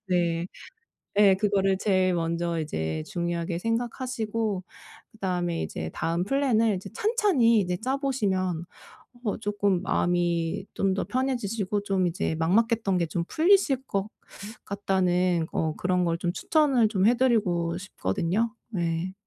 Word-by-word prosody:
네. 170 Hz, -1 st, +1 dB, 0.7 s
예 200 Hz, -2 st, +7 dB
그거를 195 Hz, -2 st, +1 dB
제일 185 Hz, -2 st, +2 dB
먼저 170 Hz, 0 st, -1 dB
이제 80 Hz, -, -3 dB
중요하게 170 Hz, 0 st, -2 dB
생각하시고 230 Hz, -3 st, -2 dB, 0.5 s
그다음에 180 Hz, -5 st, -2 dB
이제 80 Hz, 0 st, -5 dB
다음 170 Hz, +2 st, -1 dB
플랜을 230 Hz, -5 st, +2 dB, 0.2 s
찬찬히 415 Hz, -, +3 dB
이제 180 Hz, -1 st, -1 dB
짜 265 Hz, +3 st, 0 dB
보시면 190 Hz, -, -1 dB, 0.6 s
어 210 Hz, -, 0 dB
쪼끔 205 Hz, -4 st, 0 dB
마음이 175 Hz, 0 st, 0 dB
좀 195 Hz, -1 st, +1 dB
더 195 Hz, -, -1 dB
편해지시고 230 Hz, -6 st, -1 dB
좀 190 Hz, -2 st, +1 dB
이제 165 Hz, -2 st, -2 dB
막막했던 200 Hz, +3 st, +2 dB
게 170 Hz, -, +1 dB
좀 170 Hz, +1 st, -2 dB
풀리실 320 Hz, -6 st, +3 dB
것 195 Hz, 0 st, -1 dB, 0.6 s
같다는 180 Hz, -4 st, +1 dB
어 160 Hz, -1 st, -1 dB
그런 180 Hz, 0 st, +1 dB
걸 170 Hz, -1 st, 0 dB
좀 175 Hz, 0 st, -1 dB
추천을 275 Hz, -, +2 dB
좀 200 Hz, -2 st, +1 dB
해드리고 210 Hz, -9 st, +2 dB
싶거든요. 185 Hz, -, -1 dB, 0.2 s
네. 170 Hz, -1 st, -2 dB
190 Hz, 270 characters per minute, -26 LUFS, 175-225 Hz, 0.7 s, 예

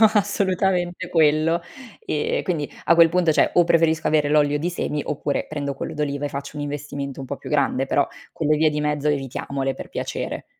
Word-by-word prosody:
no 220 Hz, -1 st, +7 dB
assolutamente 185 Hz, -3 st, 0 dB
quello. 160 Hz, 0 st, +3 dB, 0.4 s
Ehm, 470 Hz, +2 st, -1 dB
quindi, 160 Hz, -6 st, -2 dB
a 170 Hz, -, +5 dB
quel 165 Hz, 0 st, +7 dB
punto 170 Hz, -1 st, +2 dB
cioè -, -, +3 dB
o 175 Hz, -, +6 dB
preferisco 160 Hz, -1 st, +2 dB
avere 150 Hz, -1 st, +3 dB
l'olio 145 Hz, -1 st, +3 dB
di 165 Hz, +4 st, -1 dB
semi 150 Hz, -4 st, -2 dB
oppure 145 Hz, -1 st, -2 dB
prendo 145 Hz, -2 st, -3 dB
quello -, -, -5 dB
d'oliva 145 Hz, -1 st, -2 dB
e -, -, -3 dB
faccio 140 Hz, +1 st, -6 dB
un -, -, -3 dB
investimento 145 Hz, -1 st, -5 dB
un 135 Hz, -, -6 dB
po' 140 Hz, -, -4 dB
più -, -, -9 dB
grande, 135 Hz, -2 st, +1 dB
però 140 Hz, +1 st, +2 dB, 0.3 s
quelle 155 Hz, -1 st, +1 dB
vie 155 Hz, +1 st, +4 dB
di 150 Hz, 0 st, -2 dB
mezzo 150 Hz, 0 st, 0 dB
evitiamole 135 Hz, -1 st, -2 dB
per -, -, -9 dB
piacere. -, -, -4 dB
150 Hz, 200 wpm, -23 LUFS, 145-170 Hz, 0.4 s, no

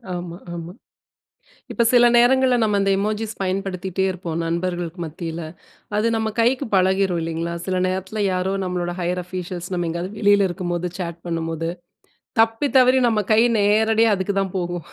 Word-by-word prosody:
ஆமா, 175 Hz, -1 st, -6 dB, 0.2 s
ஆமா. 170 Hz, +1 st, -7 dB, 1.0 s
இப்ப 235 Hz, -, +1 dB
சில 240 Hz, -1 st, +6 dB
நேரங்கள்ல 255 Hz, +1 st, +4 dB
நம்ம 210 Hz, -2 st, +2 dB
அந்த 195 Hz, -, +1 dB
எமோஜிஸ் 215 Hz, +2 st, -2 dB
பயன்படுத்திகிட்டே 190 Hz, -1 st, -2 dB
இருப்போம். 170 Hz, -3 st, -5 dB
நண்பர்களுக்கு 175 Hz, 0 st, -3 dB
மத்தியில. 165 Hz, +1 st, -6 dB, 0.5 s
அது 215 Hz, +2 st, +2 dB
நம்ம 220 Hz, -1 st, 0 dB
கைக்கு 250 Hz, +4 st, +2 dB
பழகிரும் 190 Hz, -1 st, +2 dB
இல்லேங்களா! 165 Hz, +1 st, -3 dB
சில 185 Hz, -1 st, -1 dB
நேரத்துல 190 Hz, +3 st, -3 dB
யாரோ 185 Hz, +1 st, -1 dB
நம்மளோட 175 Hz, -1 st, -2 dB
ஹையர் 180 Hz, +1 st, -1 dB
ஆஃபிஷியல்ஸ் 180 Hz, 0 st, -6 dB
நம்ம 175 Hz, -1 st, -1 dB
எங்கயாவது 170 Hz, +4 st, -4 dB
வெளில 205 Hz, -2 st, +4 dB
இருக்கும் 175 Hz, -1 st, -3 dB
போது 175 Hz, +1 st, -2 dB
சாட் 170 Hz, -2 st, -4 dB
பண்ணும்போது, 165 Hz, 0 st, -2 dB, 0.7 s
தப்பி 225 Hz, +5 st, +2 dB
தவறி 255 Hz, 0 st, +6 dB
நம்ம 220 Hz, -2 st, +1 dB
கை 215 Hz, -, +5 dB, 0.2 s
நேரடியா 220 Hz, +2 st, +3 dB
அதுக்கு 195 Hz, +1 st, -2 dB
தான் 195 Hz, -1 st, -3 dB
போகும் 175 Hz, -2 st, -3 dB
185 Hz, 155 wpm, -22 LUFS, 175-215 Hz, 1.0 s, சில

